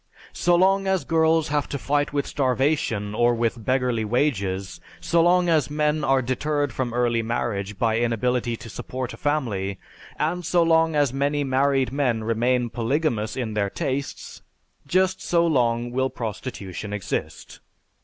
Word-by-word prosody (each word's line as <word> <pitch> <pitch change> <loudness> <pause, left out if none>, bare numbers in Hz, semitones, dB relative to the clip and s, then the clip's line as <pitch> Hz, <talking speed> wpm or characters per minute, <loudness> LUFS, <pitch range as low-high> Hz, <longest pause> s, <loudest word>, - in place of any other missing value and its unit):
So 175 0 +2
long 195 +2 +3
as 190 -6 +1
girls 160 0 +2
have 145 0 -1
to 140 - -3
fight 145 +1 0
with 140 -1 -1
starvation 130 -6 0
or 120 +2 +3
with 115 0 -1
beggarly 125 -3 +1
wages, 100 -6 -1 0.2
so 170 0 +2
long 175 +1 +4
as 155 -5 +2
men 150 +1 0
are 135 -1 +2
deterred 145 +2 -1
from 125 -1 -2
early 120 -1 +1
marriage 110 -3 -3
by 115 +1 +1
inability 120 0 0
to - - -11
support 125 +5 -5
a - - -10
family, 105 -10 -1 0.4
and 170 +4 -1
so 175 +1 +2
long 165 -1 +3
as 145 -4 +2
many 145 +1 0
married 135 0 +1
men 125 -5 0
remain 120 +2 +1
polygamous 120 -3 -1
in 115 -4 -3
their 100 -2 0
tastes, 135 +6 -4 0.5
just 185 +4 +1
so 170 -1 +2
long 120 -6 +1
will 130 +1 0
prostitution 105 -4 -6
exist. 105 -3 -5
130 Hz, 155 wpm, -24 LUFS, 115-150 Hz, 0.5 s, long